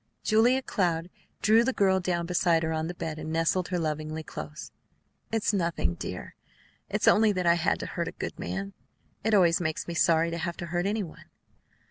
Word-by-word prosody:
Julia 240 +4 +3
Cloud 175 -6 -1 0.3
drew 220 +2 +6
the 265 +2 0
girl 190 -3 +3
down 175 -2 -1
beside 170 -1 +2
her 160 0 -1
on 160 0 -1
the 175 - -5
bed, 160 -2 -4
and 155 +1 -5
nestled 165 +2 +1
her 180 - -1
lovingly 155 -1 -2
and - - -14
close. 150 0 -7 0.6
"It's 225 -1 +1
nothing, 170 - 0
dear. - - -6 0.6
It's - - 0
only 215 0 +6
that 185 -2 -1
I 170 - +6
had 170 -1 +1
to - - -4
hurt - - -3
a - - -3
good - - -6
man. 95 +3 -4 0.5
It 220 0 +3
always 175 -3 +4
makes 160 -2 -2
me 170 - -4
sorry 165 -1 +3
to 170 - -3
have 170 0 -3
to 175 - -5
hurt 175 +2 +1
any 210 +1 0
one." 165 - -11
170 Hz, 205 wpm, -28 LUFS, 160-195 Hz, 0.6 s, drew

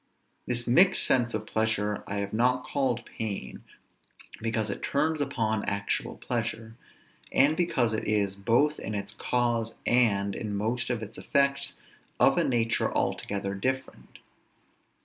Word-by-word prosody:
This 120 -1 -1
mixed 175 +11 +6
sense 120 -3 +2
of 110 0 -3
pleasure 110 -2 0
I 100 - -3
have 100 0 -3
not 125 +3 +2
called 130 -5 -1
pain, 105 -3 -6 0.8
because 110 -2 -1
it - - -6
turns 155 +2 0
upon 110 -6 -1
actual 100 0 -2
pleasure, 115 -2 -3 0.6
and 145 +3 +4
because 130 -10 +1
it 110 - -2
is, 100 -2 +1
both 120 +10 +2
in 110 - -4
its 100 +1 -3
cause 120 0 -1
and 100 -5 +3
in 105 0 -4
most 115 +5 -1
of 120 -3 -2
its 110 +1 -9
effects, 140 -1 +1 0.4
of - - +5
a - - +3
nature 115 -2 +1
altogether 100 -1 -2
different. 130 +7 -4
115 Hz, 140 wpm, -28 LUFS, 105-125 Hz, 0.8 s, mixed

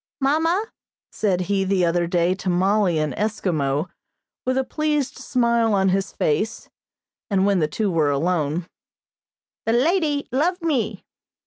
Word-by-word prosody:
"Mamma," 325 +8 +1 0.5
said 190 -4 0
he 195 +1 0
the 190 -2 +2
other 170 0 +1
day 175 +1 +2
to 190 0 -4
Mollie 185 0 +2
in 155 -1 0
Eskimo, 160 -9 -1 0.6
with 255 0 +1
a 265 - +2
pleased 300 -1 -1
smile 235 -3 +1
on 190 -1 +3
his 195 +1 0
face, 210 +10 -1 0.6
and 195 -2 +2
when 200 -2 +3
the 155 - +2
two 200 +6 -1
were 160 -4 +2
alone, 160 +2 0 1.0
"the 225 - +3
ladie 295 +2 +1
loves 335 +8 +1
me." 305 -9 -1
200 Hz, 140 wpm, -22 LUFS, 175-260 Hz, 1.0 s, on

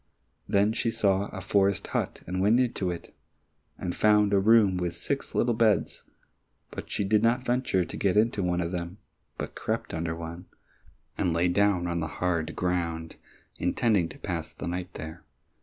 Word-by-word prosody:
Then 100 +2 +3
she 115 - 0
saw 100 -3 +1
a 95 - -7
forest 100 0 +2
hut, - - -3
and 95 +2 -2
went 110 +5 +4
into 115 -7 0
it, 85 -1 -6 0.6
and 90 - -4
found 105 -1 +4
a 100 - +5
room 105 -2 +5
with 90 -1 -2
six 140 -1 -3
little 120 0 +2
beds, 110 -2 +2 0.7
but - - -7
she - - -1
did 105 +2 +3
not 120 +3 +2
venture 120 -8 +1
to - - -7
get 100 0 +1
into 110 -1 +3
one 90 -1 0
of 85 0 -2
them, 90 +1 -4 0.4
but - - -5
crept - - -3
under 80 0 -2
one, 85 +2 -7 0.7
and 85 - +1
lay 85 +2 +2
down 100 -1 +2
on 85 -1 -1
the 80 - -2
hard 85 -2 -1
ground, 85 -3 -2 0.4
intending 100 -8 +2
to - - -11
pass - - -4
the - - -7
night 90 +1 -4
there. 80 +2 -8
95 Hz, 175 wpm, -27 LUFS, 85-105 Hz, 0.7 s, a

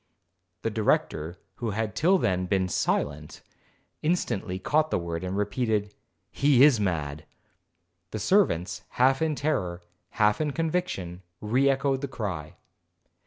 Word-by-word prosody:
The 115 - 0
Director, 85 -6 0 0.2
who 115 - -2
had 110 0 -2
till 180 +10 +4
then 90 - 0
been 95 -1 +1
silent, 75 -3 -2 0.6
instantly 130 - -1
caught 155 +11 +1
the - - +1
word, 85 0 -4
and 95 +1 -3
repeated, 105 -1 -1 0.4
'He 140 -2 +4
is 140 -6 +6
mad.' 80 -6 -2 0.9
The 110 - -5
servants, 100 - +2 0.2
half 135 +3 +4
in 160 -2 +1
terror, 90 - -1 0.3
half 105 +5 +3
in 150 -2 -1
conviction, 160 - -2 0.2
re 125 +6 +2
echoed 135 0 +1
the 140 - -2
cry. 90 - -5
105 Hz, 130 wpm, -27 LUFS, 90-140 Hz, 0.9 s, is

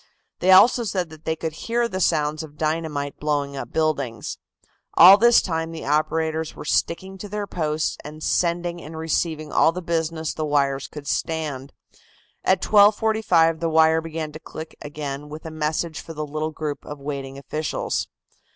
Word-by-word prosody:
They 180 - +1
also 235 +6 +7
said 185 -6 -2
that 155 0 -14
they 160 - 0
could 160 0 -4
hear 235 +8 -1
the 190 -5 -4
sound 150 -3 +1
of 150 -2 -11
dynamite 155 -2 -2
blowing 145 -2 -1
up 125 -3 -6
buildings. 140 -8 -1 0.6
All 185 +3 +10
this 235 +3 +5
time 165 -2 -2
the 165 - -7
operators 160 +2 0
were - - -9
sticking 190 +5 -1
to 205 - -7
their 205 0 -3
posts 155 -4 -2
and 155 +1 -9
sending 175 0 0
and 160 +1 -9
receiving 160 -1 -1
all 160 - +4
the 180 - -5
business 165 -1 -1
the 155 - -3
wires 140 -2 +1
could 150 -1 -10
stand. 145 -5 -2 0.7
At 185 0 +2
12.45 205 -6 +4
the 165 - 0
wire 160 0 +4
began 160 -1 -5
to 155 - -9
click 160 0 -9
again 145 0 -6
with 155 +2 -9
a 160 - -6
message 155 +1 -2
for 165 - -10
the 155 0 -3
little 155 +1 -3
group 150 -2 -5
of 150 - -8
waiting 140 -1 -5
officials. 150 +2 -3
160 Hz, 170 wpm, -23 LUFS, 150-170 Hz, 0.7 s, All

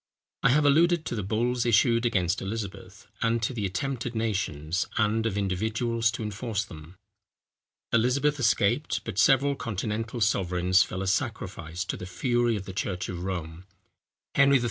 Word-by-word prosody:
I - - +4
have 145 +3 +4
alluded 165 +3 +4
to - - -3
the 105 - -2
bulls 120 +5 0
issued 115 0 +3
against 90 -5 0
Elizabeth, 100 0 -6 0.2
and 115 0 +2
to 120 - 0
the 105 -5 -1
attempts 125 +7 -3
of 120 - -6
nations, 90 -7 -1
and 110 +1 +2
of 105 -3 -2
individuals, 110 +4 0
to 120 - -4
enforce 105 +1 -3
them. 80 +1 -12 1.0
Elizabeth 135 +5 +2
escaped; 115 -5 +1
but 95 - -4
several 140 +2 +4
continental 115 0 -3
sovereigns 90 -3 +2
fell 95 +1 -1
a - - -3
sacrifice 95 - -2
to - - -3
the 90 - -7
fury 120 +4 +1
of 100 -2 -5
the 95 - -7
church 95 -1 -3
of 90 -1 -5
Rome. 90 -2 -5 0.7
Henry 140 -1 +5
III. - - -1
110 Hz, 165 wpm, -27 LUFS, 95-120 Hz, 1.0 s, Henry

